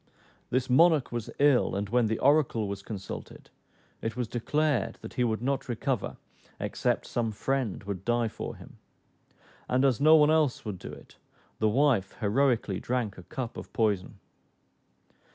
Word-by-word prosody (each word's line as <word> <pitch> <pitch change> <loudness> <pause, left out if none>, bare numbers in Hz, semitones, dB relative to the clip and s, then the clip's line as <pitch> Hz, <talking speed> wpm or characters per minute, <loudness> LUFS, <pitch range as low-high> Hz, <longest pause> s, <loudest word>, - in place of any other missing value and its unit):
This 130 +1 0
monarch 155 +2 +4
was 120 -2 -4
ill; 140 -7 +3
and 100 +1 -2
when 120 0 +3
the 110 +1 -1
oracle 135 -6 +3
was 100 0 -5
consulted, 100 -1 -8 0.5
it 115 -1 -3
was 125 -2 -1
declared 140 +1 0
that 110 - -9
he 125 - 0
would 110 -1 -1
not 135 0 -1
recover 120 -1 -2 0.4
except - - -1
some 115 -2 -1
friend 125 -1 -2
would 100 -2 -5
die 120 0 +1
for - - -6
him; - - -14 0.9
and 130 +2 +3
as 135 -2 +2
no 155 +2 +7
one 150 -1 +5
else 155 -7 +1
would 100 -4 -5
do - - -8
so, - - -21 0.4
the 110 - +3
wife 120 -5 +2
heroically 110 -2 +1
drank 120 -5 -2
a 90 - -15
cup 125 -4 -5
of - - -8
poison. 105 -5 0
120 Hz, 160 wpm, -28 LUFS, 105-135 Hz, 0.9 s, no